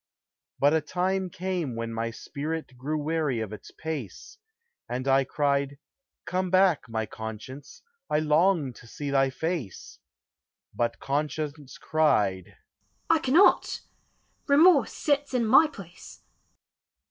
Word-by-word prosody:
But 145 Hz, +2 st, +4 dB
a 160 Hz, -, +3 dB
time 185 Hz, +2 st, -1 dB
came 175 Hz, -7 st, -3 dB
when 115 Hz, 0 st, -4 dB
my 115 Hz, +1 st, -2 dB
spirit 145 Hz, +4 st, -5 dB
Grew 145 Hz, +5 st, -3 dB
weary 150 Hz, -4 st, -1 dB
of 110 Hz, -2 st, -4 dB
its 105 Hz, -, -10 dB
pace: 155 Hz, -, -7 dB, 0.5 s
And 130 Hz, +2 st, -3 dB
I 135 Hz, 0 st, +4 dB
cried, 140 Hz, 0 st, 0 dB, 0.5 s
"Come 185 Hz, 0 st, -1 dB
back, 185 Hz, -8 st, +3 dB
my 110 Hz, -1 st, -2 dB
Conscience, 110 Hz, -, -9 dB, 0.3 s
I 150 Hz, -, +2 dB
long 155 Hz, -2 st, +2 dB
to 115 Hz, -, -15 dB
see 145 Hz, +4 st, -5 dB
thy 135 Hz, -1 st, +3 dB
face;" 150 Hz, -, -5 dB, 0.7 s
But 120 Hz, -1 st, -1 dB
Conscience 150 Hz, 0 st, -3 dB
cried, 105 Hz, -, +1 dB, 0.5 s
"I 325 Hz, -, +4 dB
cannot, 310 Hz, +6 st, +4 dB, 0.7 s
Remorse 290 Hz, -1 st, +5 dB
sits 285 Hz, -2 st, 0 dB
in 240 Hz, -2 st, +2 dB
my 265 Hz, +8 st, +6 dB
place." 195 Hz, -, -12 dB
150 Hz, 125 wpm, -27 LUFS, 130-185 Hz, 0.7 s, my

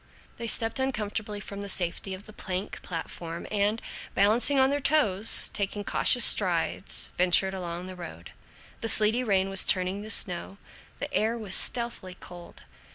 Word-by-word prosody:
They 230 Hz, -, -5 dB
stepped 225 Hz, +3 st, 0 dB
uncomfortably 215 Hz, -5 st, -3 dB
from 200 Hz, 0 st, -9 dB
the 200 Hz, -, -5 dB
safety 185 Hz, +1 st, -3 dB
of 190 Hz, -, -13 dB
the 215 Hz, -, -13 dB
plank 190 Hz, -1 st, -6 dB
platform 165 Hz, -1 st, -7 dB
and, 210 Hz, +1 st, 0 dB, 0.4 s
balancing 225 Hz, +8 st, +2 dB
on 265 Hz, 0 st, +3 dB
their 285 Hz, -, -1 dB
toes, 225 Hz, -9 st, +3 dB
taking 205 Hz, 0 st, -3 dB
cautious -, -, +4 dB
strides, -, -, +2 dB
ventured 185 Hz, +1 st, +4 dB
along 175 Hz, -1 st, -6 dB
the 185 Hz, 0 st, -9 dB
road. 175 Hz, -2 st, -11 dB, 0.5 s
The 225 Hz, -, +1 dB
sleety 220 Hz, +4 st, +4 dB
rain 195 Hz, -4 st, 0 dB
was 195 Hz, -1 st, +4 dB
turning 185 Hz, +2 st, -1 dB
to 215 Hz, -, -9 dB
snow. 185 Hz, -2 st, +2 dB, 0.4 s
The -, -, -7 dB
air 225 Hz, +2 st, 0 dB
was 210 Hz, -5 st, -6 dB
stealthily 235 Hz, -7 st, -2 dB
cold. 175 Hz, -1 st, -13 dB
200 Hz, 160 wpm, -26 LUFS, 185-225 Hz, 0.5 s, cautious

